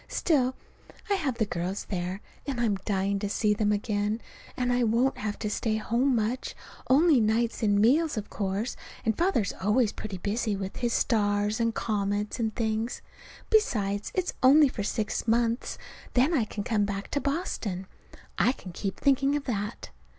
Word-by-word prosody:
Still, 260 -6 +1 0.6
I'll 400 - +4
have 275 -9 -2
the 220 - +2
girls 185 +1 -3
there, 185 +1 -3 0.3
and 270 -4 -2
I'm 230 -3 +2
dying 200 -1 0
to 205 0 -2
see 210 0 +2
them 210 0 +1
again 210 +1 0 0.4
and 245 -1 +1
I 245 0 +2
won't 235 +4 +2
have 210 -1 -3
to 215 - -3
stay 215 +1 0
home 240 +5 +1
much, 230 +3 -1 0.3
only 295 +1 +6
nights 225 +2 +1
and 205 -2 +3
meals, 280 +6 +3
of 210 - -3
course, 200 +3 -2 0.3
and 220 -1 +2
Father's 340 - +1
always 210 +3 +3
pretty 200 -3 -6
busy 210 +3 -1
with 195 0 -5
his 240 -1 0
stars 205 -1 +1
and 230 -1 +1
comets 205 0 -1
and 220 -2 -1
things. 220 +1 -2 0.5
Besides, 205 - +1
it's 370 -2 0
only 280 +2 +7
for 225 - -5
six 215 +2 -2
months, 230 +1 +1 0.4
then 260 +7 +4
I 255 -9 +2
can 210 -1 -5
come 215 -2 +1
back 200 0 -4
to 285 - 0
Boston. 260 - -2 0.5
I 250 - +4
can 185 - -10
keep 195 +2 -4
thinking 275 0 +3
of 290 - -1
that. 210 -3 -4
220 Hz, 170 wpm, -28 LUFS, 205-250 Hz, 0.6 s, only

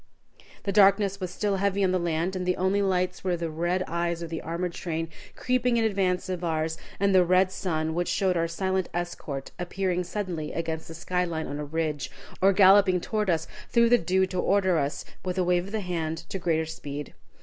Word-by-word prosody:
The 200 - -1
darkness 200 0 +4
was 185 -2 -3
still 200 +2 -1
heavy 200 0 +1
on 185 - +3
the 185 - +1
land 170 +2 -1
and 185 - -2
the 180 0 0
only 190 +2 +2
lights 185 -1 0
were 180 -2 0
the 165 -1 -3
red 175 +3 0
eyes 170 0 -1
of 165 - -7
the 165 - -3
armored 170 +2 -3
train 165 -2 -3 0.3
creeping 250 -1 +1
in 230 - +2
advance 190 -4 +1
of 180 -1 -3
ours, 160 -1 0 0.2
and 200 0 +3
the 185 -1 +6
red 185 +1 +3
sun, 160 -4 -2
which 175 +1 -1
showed 190 -2 +1
our 165 -1 +1
silent 190 +2 -1
escort 155 -6 -4
appearing 180 0 -1
suddenly 175 -4 -4
against 165 -1 -3
the 165 - -8
sky 180 +2 -1
line 160 -3 -3
on 145 - -5
a 150 - -3
ridge, 155 -2 -2 0.3
or 195 +1 +6
galloping 195 -1 +6
toward 210 +2 -1
us 165 -2 +1 0.2
through 235 -1 +4
the 245 0 +6
dew 190 +2 +2
to 185 -1 -4
order 190 -3 +3
us, 140 +1 -2 0.2
with 185 0 -3
a 185 - +3
wave 180 +1 +1
of - - -9
the 220 -1 -1
hand, 165 -3 -2
to 195 - -3
greater 160 -2 +1
speed. 145 -2 -7
180 Hz, 215 wpm, -27 LUFS, 165-190 Hz, 0.3 s, the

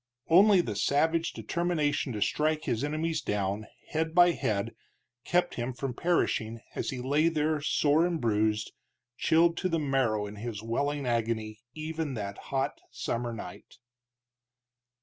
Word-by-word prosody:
Only 190 +3 +7
the 110 -11 -4
savage 160 +9 +2
determination 155 -5 -1
to 105 -2 +1
strike 155 +6 0
his 115 +3 -1
enemies 155 +1 -1
down, 105 -1 -2 0.2
head 160 +1 -1
by 175 0 +7
head, 105 -10 -1 0.5
kept 175 0 +1
him 120 +2 -3
from 125 +1 -4
perishing 115 -8 0
as - - -3
he 135 - -4
lay 145 +6 +2
there 155 -1 0
sore 155 +3 +3
and 170 -2 -2
bruised, 110 -2 +1 0.4
chilled 165 +4 +3
to 185 - 0
the 165 - +1
marrow 135 -8 +1
in 105 0 -8
his 110 -1 -5
welling 140 +5 -1
agony 110 -2 -1 0.2
even 155 -2 -3
that 100 -2 -5
hot 135 +1 -1
summer 120 0 -3
night. 105 -5 -9
140 Hz, 145 wpm, -29 LUFS, 110-160 Hz, 0.5 s, Only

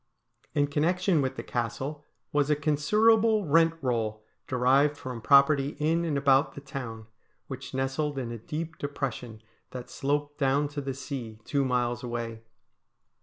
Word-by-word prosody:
In 145 -1 +4
connection 165 +4 +1
with 130 -1 -2
the - - -5
Castle 130 +5 -3 0.3
was 145 0 +2
a 150 - +4
considerable 210 +9 +3
rent 165 +2 +4
roll 110 -4 -1 0.2
derived 135 +4 +3
from 125 -4 -6
property 140 +2 +4
in 165 +3 +1
and 150 -4 0
about 140 +1 +3
the - - -6
town, 125 -5 -7 0.4
which 130 0 -7
nestled 135 +2 -1
in 125 -3 -3
a 115 - -6
deep 155 +7 -5
depression 125 -6 -4 0.3
that 125 -1 -8
sloped 145 +1 -2
clown 140 +1 +2
to 145 0 -4
the 135 -1 -4
sea, 130 -5 -6
two 140 -1 +1
miles 120 -2 0
away. 120 -2 -4
140 Hz, 150 wpm, -28 LUFS, 125-150 Hz, 0.4 s, In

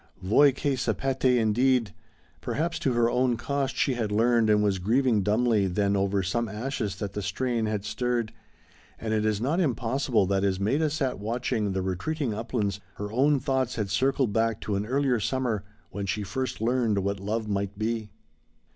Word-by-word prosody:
Voi 140 +10 +5
che 140 +1 -1
sapete 130 0 +1
indeed! 115 -1 +2 0.5
Perhaps 165 - -2
to 130 - 0
her 120 -1 +3
own 125 0 +1
cost 135 +1 -2
she 135 - +1
had 115 -4 -2
learned 115 +1 +3
and 105 0 +4
was 100 -2 +1
grieving 115 +3 +2
dumbly 105 0 +2
then 100 +2 +1
over 100 0 +1
some 115 +5 -1
ashes 110 -2 -3
that 100 -1 -5
the 105 - -3
strain 115 +4 -1
had 105 -1 -2
stirred, 115 +1 -1 0.6
and 110 -1 -3
it 110 0 +1
is 105 -2 0
not 140 - 0
impossible 130 - +1
that 95 +1 0
as 95 -1 +1
Maida 140 +10 +1
sat 140 -6 -2
watching 110 -2 -1
the 95 0 -1
retreating 110 - -2
uplands 105 -2 -2 0.2
her 105 0 -5
own 140 +4 +3
thoughts 130 -1 -1
had 105 -4 -2
circled 130 +1 +1
back 115 -1 +1
to 105 - -2
an 100 +2 -2
earlier 130 -1 +1
summer 120 -3 -1 0.3
when 100 -1 -4
first 105 +6 -2
she 110 - -3
learned 120 -4 +1
what 100 0 -1
Love 110 +3 -2
might 100 -1 -2
be. 110 0 -2
115 Hz, 180 wpm, -27 LUFS, 100-130 Hz, 0.6 s, Voi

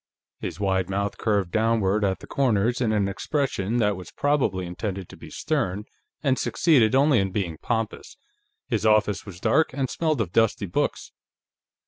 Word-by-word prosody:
His - - -5
wide 95 -2 0
mouth 100 +1 -2
curved 100 -5 0
downward 110 -2 +1
at 95 -1 0
the - - -9
corners 120 -3 +1
in 115 -3 +2
an 105 -2 +1
expression 115 0 -1
that 105 -3 +2
was 90 -2 -9
probably 130 -11 0
intended 95 +1 -5
to - - -11
be - - -12
stern 115 -11 -2 0.4
and 135 -3 +2
succeeded 130 -8 +3
only 140 -2 +4
in 95 0 0
being 90 -6 -3
pompous. 115 -2 -3 0.5
His 110 -5 -1
office 105 -2 +2
was 90 -3 -9
dark, 160 +8 +2
and 135 -1 -2
smelled 155 -5 0
of 100 -6 -1
dusty 115 -2 +2
books. 85 - -2
105 Hz, 165 wpm, -25 LUFS, 95-125 Hz, 0.5 s, only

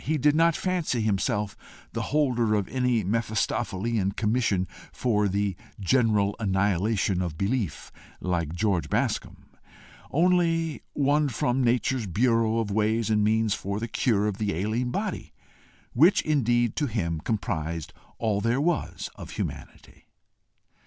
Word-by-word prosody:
He 155 +2 0
did 145 +2 +3
not 165 0 +4
fancy 175 -10 -1
himself 105 0 0 0.4
the - - -2
holder 125 -7 +2
of 100 -3 0
any 125 -4 +1
Mephistophelean 110 -1 -1
commission 105 -4 +1 0.2
for 105 -4 +1
the 100 0 -1 0.2
general 105 -1 +2
annihilation 100 -1 +1
of 85 -4 -3
belief 100 - -2 0.3
like 85 -4 -1
George 90 -2 0
Bascombe, - - -2 0.6
only 165 -1 +2
one 145 +1 +2
from 125 +2 0
nature's 125 -1 +1
bureau 115 +3 +2
of 110 -3 -1
ways 110 +1 +1
and 105 -1 +3
means 110 0 +2
for 100 0 -3
the 115 - -3
cure 110 -2 +1
of 105 -2 -2
the 105 -4 -1
ailing 110 +7 -1
body - - -4 0.6
which, 165 +10 +5
indeed, 120 -6 +1
to 150 - +1
him, 85 -9 -2
comprised 85 -6 -3 0.2
all 105 -3 0
there 115 +4 +1
was 165 +2 -1
of - - -10
humanity. - - -7
110 Hz, 130 wpm, -26 LUFS, 100-125 Hz, 0.6 s, which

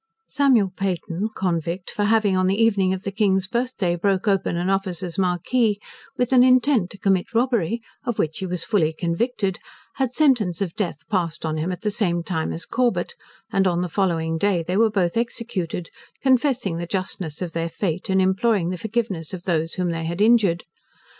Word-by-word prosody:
Samuel 250 -9 +3
Peyton, 195 +1 -2
convict, 175 0 -2
for 205 - -1
having 215 -2 +3
on 185 0 +2
the 195 +3 +1
evening 200 -5 +3
of 190 0 -3
the 200 - -3
King's 195 -2 +2
birth 245 +5 -2
day 180 -4 +1
broke 195 +3 0
open 195 -3 +1
an 175 +1 -1
officer's 190 -2 -2
marquee, 200 +4 +1 0.4
with 250 +1 +1
an 250 -1 +7
intent 255 -5 +4
to - - -11
commit 195 +1 0
robbery, 235 -3 +1 0.2
of 240 -5 -2
which 155 0 -1
he 190 - -3
was 180 -1 -3
fully 160 -8 +2
convicted, 190 +4 -1 0.4
had 265 -3 0
sentence 240 - +2
of 185 -4 -2
death 175 -9 -3
passed 170 -6 -1
on 155 0 -1
him 160 +4 -1
at 180 0 -5
the 210 - -1
same 175 -6 0
time 165 -3 -2
as 165 - -5
Corbet; 250 - 0 0.4
and 195 -1 +2
on 175 -1 +1
the 180 - -1
following 165 -3 0
day 190 -3 +2
they 180 +3 -2
were 225 +2 +4
both 185 -5 0
executed, 220 -8 -3 0.3
confessing 255 - +2
the 170 0 -4
justness 185 -4 -3
of 175 -3 -4
their 165 0 -2
fate, 175 +1 -3
and 190 0 +3
imploring 190 0 +2
the 180 - -4
forgiveness 205 -7 -2
of 175 - -10
those 165 -3 0
whom 180 -2 -1
they 165 -1 -3
had 170 +2 -3
injured. 210 -6 +4
190 Hz, 190 wpm, -23 LUFS, 170-220 Hz, 0.4 s, an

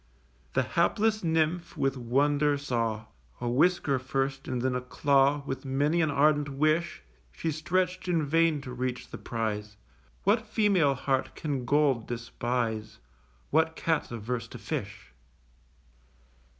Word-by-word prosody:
The - - +2
hapless 215 -1 +1
Nymph 160 +1 0
with 135 -1 +1
wonder 145 +4 +2
saw: 115 -6 -2 0.3
A 120 - -3
whisker 140 +1 +2
first 135 +1 -2
and 125 -1 -2
then 130 -1 +1
a 125 - -1
claw, 140 +2 +2
With 135 - -4
many 145 +5 +1
an 160 - +2
ardent 145 +1 +3
wish, 155 - 0 0.3
She 160 - -3
stretch'd 180 +4 -1
in 165 -4 +2
vain 165 0 +2
to 130 -2 -7
reach 125 0 -4
the - - -7
prize. 105 -2 -3 0.5
What 220 +3 +2
female 190 -10 +3
heart 135 0 -1
can 140 -5 -3
gold 140 -4 +2
despise? 115 -2 -3 0.5
What 160 +1 +2
Cat's 160 -2 0
averse 115 0 -4
to - - -9
fish? - - -6
140 Hz, 135 wpm, -28 LUFS, 125-160 Hz, 0.5 s, ardent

